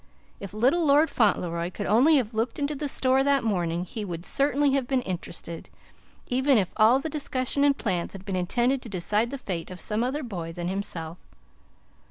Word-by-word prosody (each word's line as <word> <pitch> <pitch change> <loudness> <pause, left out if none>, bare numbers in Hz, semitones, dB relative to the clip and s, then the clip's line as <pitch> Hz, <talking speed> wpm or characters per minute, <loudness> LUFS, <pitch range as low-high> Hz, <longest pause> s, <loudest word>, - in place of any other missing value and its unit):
If 195 - -7
little 265 +10 +3
Lord 300 +1 +4
Fauntleroy 175 -6 +1
could - - -5
only 255 +10 +5
have 235 -4 -1
looked 225 +3 -1
into 290 0 -1
the 290 0 -3
store 265 0 +2
that 280 -1 +2
morning, 175 -5 -1
he 215 +4 -6
would 175 -3 -6
certainly 285 0 +2
have 270 -2 0
been 260 -2 0
interested, 170 -2 -6 0.6
even 260 +1 +3
if 190 -4 0
all 225 +3 +5
the 275 - -3
discussion 280 -2 -1
and 285 -1 +4
plans 180 -6 -2
had 195 -1 -10
been 195 - -3
intended 240 +9 +1
to 235 - -10
decide 210 +4 0
the 275 - -5
fate 180 -10 -5
of 180 -1 -8
some 215 +2 -1
other 280 +5 -2
boy 175 -8 -5
than 175 0 -4
himself. 180 -4 -5
230 Hz, 195 wpm, -26 LUFS, 180-275 Hz, 0.6 s, only